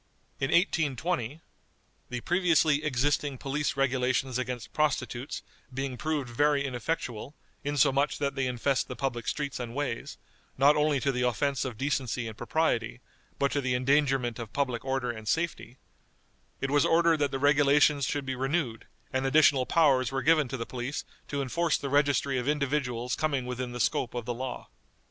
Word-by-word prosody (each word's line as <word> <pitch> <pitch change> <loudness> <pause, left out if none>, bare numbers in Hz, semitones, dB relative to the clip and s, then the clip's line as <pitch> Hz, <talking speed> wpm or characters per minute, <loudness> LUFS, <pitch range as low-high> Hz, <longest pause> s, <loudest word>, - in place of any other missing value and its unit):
In 135 - 0
1820, 160 - 0 0.7
"the 125 -1 -4
previously 165 -4 +3
existing 145 0 0
police 140 +1 -2
regulations 130 -1 +1
against 120 -5 -5
prostitutes 140 -3 -1 0.3
being 135 0 -3
proved 150 +1 -2
very 140 +3 +2
ineffectual, 130 0 -4 0.3
insomuch 145 0 +2
that 140 -1 -1
they 135 -2 -1
infest 125 +2 0
the 125 - -6
public 120 -4 -3
streets 145 -2 -2
and 120 -1 -5
ways, 135 -5 -3 0.4
not 140 +3 +6
only 150 -2 +2
to 140 - +1
the 125 -1 -2
offense 135 +3 0
of 125 -4 -5
decency 130 -3 -1
and 110 - -7
propriety, 120 -6 -1 0.4
but 140 0 +1
to 145 - 0
the 130 -2 0
endangerment 130 -2 +1
of 115 -2 -6
public 130 -4 -1
order 130 -2 -1
and 110 -2 -9
safety," 165 -3 -2 0.8
it 135 - -1
was 145 0 +4
ordered 165 0 +4
that 145 -1 +1
the 135 - -3
regulations 145 +1 +4
should 145 +2 -2
be 130 - -2
renewed, 135 -2 -2 0.3
and 130 +1 +1
additional 135 -2 +4
powers 135 -6 +3
were 135 0 -2
given 155 -3 +4
to 130 +2 -4
the 115 - -4
police 125 +4 -4 0.2
to 140 -1 -2
enforce 165 +4 +1
the 140 - -5
registry 140 -1 +2
of 125 - -4
individuals 140 -4 -1
coming 140 -5 -1
within 125 0 -4
the 125 - -6
scope 120 0 0
of 120 -2 -3
the 120 - -2
law. 130 +2 -5
135 Hz, 165 wpm, -28 LUFS, 125-145 Hz, 0.8 s, not